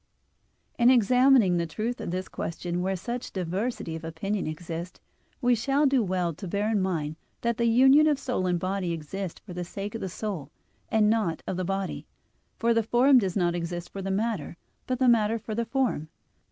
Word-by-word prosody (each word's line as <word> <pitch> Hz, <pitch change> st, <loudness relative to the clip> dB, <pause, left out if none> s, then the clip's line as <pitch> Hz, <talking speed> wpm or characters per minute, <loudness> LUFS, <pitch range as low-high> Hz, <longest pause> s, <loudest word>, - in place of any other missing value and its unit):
In 240 Hz, +1 st, +6 dB
examining 250 Hz, -4 st, +5 dB
the 170 Hz, 0 st, -1 dB
truth 220 Hz, +10 st, -3 dB
of -, -, -4 dB
this 185 Hz, +2 st, -3 dB
question, 175 Hz, +1 st, -4 dB
where 190 Hz, +1 st, 0 dB
such 240 Hz, +7 st, -5 dB
diversity 185 Hz, 0 st, -3 dB
of 160 Hz, -, -7 dB
opinion 180 Hz, +5 st, -3 dB
exists, 165 Hz, +2 st, -6 dB, 0.4 s
we 245 Hz, 0 st, +4 dB
shall 275 Hz, +5 st, +2 dB
do 270 Hz, -2 st, +4 dB
well 180 Hz, -4 st, 0 dB
to 185 Hz, +6 st, -8 dB
bear 205 Hz, +5 st, 0 dB
in 210 Hz, -3 st, +2 dB
mind 160 Hz, -5 st, -2 dB, 0.2 s
that 235 Hz, -1 st, 0 dB
the 235 Hz, -, +2 dB
union 265 Hz, +6 st, +6 dB
of 295 Hz, -2 st, +3 dB
soul 250 Hz, -9 st, -2 dB
and 175 Hz, -1 st, +1 dB
body 185 Hz, -1 st, -1 dB
exists 170 Hz, +3 st, -5 dB
for 185 Hz, -, -8 dB
the 180 Hz, 0 st, -4 dB
sake 200 Hz, +4 st, -6 dB
of 225 Hz, -, -5 dB
the 190 Hz, -, -3 dB
soul 180 Hz, -7 st, -5 dB, 0.4 s
and 220 Hz, -2 st, +3 dB
not 210 Hz, -7 st, +1 dB
of -, -, -3 dB
the 185 Hz, -, -2 dB
body; 195 Hz, +1 st, -3 dB, 0.5 s
for 235 Hz, 0 st, +2 dB
the 230 Hz, -, +3 dB
form 250 Hz, +4 st, +5 dB
does 190 Hz, -5 st, -2 dB
not 175 Hz, -2 st, +2 dB
exist 175 Hz, 0 st, -4 dB
for 195 Hz, -, -6 dB
the 195 Hz, -, -3 dB
matter, 195 Hz, -5 st, -2 dB, 0.3 s
but 255 Hz, -, 0 dB
the 260 Hz, 0 st, +2 dB
matter 225 Hz, -2 st, +4 dB
for 215 Hz, 0 st, -6 dB
the 235 Hz, +2 st, -1 dB
form. 230 Hz, -, -1 dB
195 Hz, 200 wpm, -27 LUFS, 175-235 Hz, 0.5 s, In